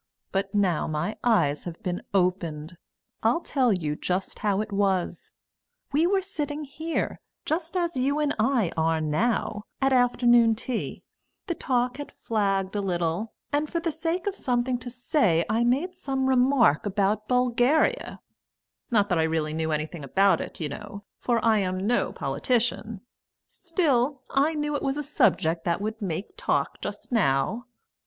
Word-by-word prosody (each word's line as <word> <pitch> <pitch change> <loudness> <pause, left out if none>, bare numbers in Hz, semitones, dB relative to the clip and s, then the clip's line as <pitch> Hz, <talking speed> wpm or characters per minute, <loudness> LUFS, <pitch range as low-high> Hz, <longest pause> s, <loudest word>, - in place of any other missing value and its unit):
But 195 +1 -2
now 190 -5 +2
my 155 +7 -2
eyes 170 -12 +2
have 175 -1 -7
been 180 -1 -2
opened. 175 -4 0 0.5
I'll 235 +10 +2
tell 260 -7 +1
you 155 -6 -1
just 185 +4 -3
how 205 -2 +1
it 215 0 -3
was. 195 -3 0 0.6
We 310 +4 +3
were 385 0 +2
sitting 300 -5 -2
here, 315 +4 -3 0.3
just 330 +3 -2
as 345 -2 -1
you 275 +3 +1
and 295 -1 +1
I 225 -5 +2
are 160 0 +1
now, 205 +7 0 0.2
at 270 0 +2
afternoon 240 -2 +4
tea; 235 +1 -4 0.4
the 345 - -1
talk 250 -4 0
had 290 - -7
flagged 195 -3 -1
a 205 - 0
little, 175 +2 -1 0.2
and 295 +1 +1
for 335 - -1
the 335 0 -1
sake 330 +3 -2
of 405 - 0
something 245 -6 0
to 245 0 -7
say 240 - +1
I 225 +3 +1
made 275 +10 +1
some 270 -7 -2
remark 250 - +4
about 205 +1 0
Bulgaria 250 - +2 0.7
not 210 -5 +3
that 175 -3 +2
I 160 0 +2
really 155 -1 -1
knew 160 0 -1
anything 155 +1 -3
about 195 +8 +3
it, - - -8
you 160 - -2
know, 200 +7 -8 0.2
for 240 -1 +1
I'm 200 -5 +2
no 240 +3 +1
politician; 215 - -1 0.5
still, 285 -7 0
I 290 +4 +2
knew 295 0 -1
it - - -2
was 270 +1 -1
a 295 - -2
subject 165 - +2
that 170 0 +1
would 220 +2 -4
make 195 - -4
talk - - -1
just - - -6
now. 220 - +1
225 Hz, 160 wpm, -26 LUFS, 185-275 Hz, 0.7 s, afternoon